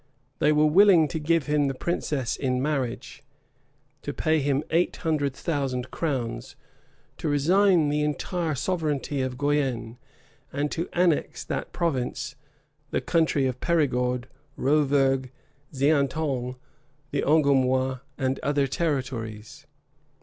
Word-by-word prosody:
They 150 - +4
were 150 0 +4
willing 175 0 +6
to 160 - -3
give 165 0 +1
him 150 -1 +2
the 135 - -2
princess 140 -5 -2
in 130 -2 -1
marriage, 135 -4 -3 0.8
to - - -4
pay 155 0 +2
him 140 0 0
eight 170 +2 +2
hundred 145 -4 0
thousand 135 -6 -2
crowns, 130 -8 -3 0.6
to - - -2
resign 170 +3 +3
the 150 +1 0
entire 155 +2 -1
sovereignty 150 -2 -1
of 130 -1 -3
Guienne, 130 -5 -1 0.5
and 145 +1 -2
to 165 - -3
annex 175 -3 +1
to - - -25
that - - -3
province 135 -4 -2 0.5
the - - 0
country 160 -5 +1
of 130 -1 -2
Perigord, 125 -6 +1 0.3
Rovergue 135 -2 +2 0.4
Xaintonge, 140 -2 0 0.6
the 140 - 0
Angoumois, 130 -3 +2 0.2
and 130 0 -1
other 145 0 +1
territories. 130 -3 -3
145 Hz, 120 wpm, -26 LUFS, 130-155 Hz, 0.8 s, willing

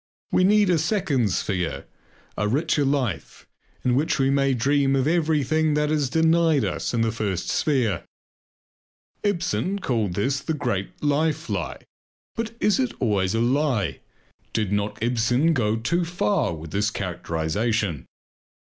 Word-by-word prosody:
We - - +3
need 205 0 +4
a 170 - +3
second 155 - +1
sphere, 90 -2 -2 0.5
a 105 - 0
richer 145 +5 +1
life, 135 -5 -2 0.4
in 125 - +3
which 150 +6 +1
we 135 -1 +2
may 135 -1 +2
dream 135 +2 +2
of 135 -1 +1
everything 155 -2 +1
that 150 0 +1
is 150 -4 +1
denied 160 -3 +3
us 95 - -2
in 115 - 0
the 115 0 +1
first 105 -5 -3
sphere. 125 - +1 1.2
Ibsen 195 0 -1
called 115 - -1
this 135 +8 0
"The 160 +3 -3
Great 100 -6 -3
Life 155 +2 0
Lie." - - -3 0.5
But 230 0 -4
is 210 +4 +2
it 255 -3 -1
always 100 -5 +1
a 115 - +1
lie? 125 - +1 0.5
Did 105 -3 0
not 105 +1 -1
Ibsen 125 +6 +2
go 110 -6 +1
too 170 +11 0
far 175 - 0
with 80 0 -9
this 105 +2 +1
characterization? 90 - -2
135 Hz, 145 wpm, -24 LUFS, 105-160 Hz, 1.2 s, need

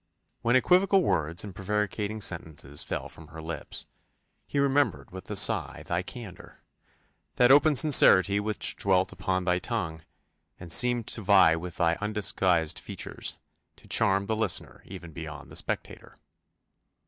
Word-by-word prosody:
When 120 +1 +1
equivocal 185 +7 +3
words 80 - 0
and 100 -2 -8
prevaricating 105 +2 -3
sentences 80 -6 -2
fell - - -5
from 80 - -15
her 80 +1 -12
lips, 80 -2 -7 0.6
he - - -5
remembered 135 - 0
with 95 0 -10
a - - -4
sigh - - +2
thy 85 +1 -2
candour 100 -1 -12 0.7
that 125 +1 +4
open 145 +2 +5
sincerity 100 - +6
which 105 +1 -1
dwelt 95 -3 +1
upon 95 0 -2
thy 90 0 0
tongue, 90 -8 -4 0.6
and 90 -2 -5
seemed 120 +3 +3
to 110 - -3
vie 95 -5 +5
with 85 +1 -7
thy 85 0 +1
undisguised 95 -6 0
features, - - -5 0.4
to - - -20
charm 100 +1 +1
the 110 - -2
listener 110 -4 -2
even 90 -3 -10
beyond 75 -4 -9
the - - -11
spectator. - - -5
95 Hz, 145 wpm, -27 LUFS, 85-115 Hz, 0.7 s, sincerity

